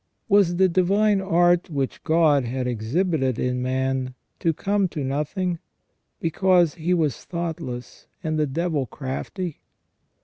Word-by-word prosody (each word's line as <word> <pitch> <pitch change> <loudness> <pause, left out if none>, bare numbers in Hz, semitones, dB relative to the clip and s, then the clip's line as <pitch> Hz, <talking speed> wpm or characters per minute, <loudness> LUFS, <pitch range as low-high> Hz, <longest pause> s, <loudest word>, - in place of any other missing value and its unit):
Was 200 -5 +4
the 190 +1 +4
divine 195 +3 +2
art 175 -2 +3
which 140 -4 -3
God 155 -4 +4
had 125 +2 -3
exhibited 130 - 0
in 125 0 -1
man 130 0 -1 0.2
to 165 - +2
come 200 +4 0
to 155 -4 -5
nothing, 155 +6 -2 0.6
because 175 0 +3
he 170 +1 -3
was 155 -6 0
thoughtless 160 -8 -5 0.2
and 155 -1 -1
the 150 - +2
devil 150 -2 -1
crafty 150 - -5
160 Hz, 130 wpm, -24 LUFS, 130-180 Hz, 0.6 s, Was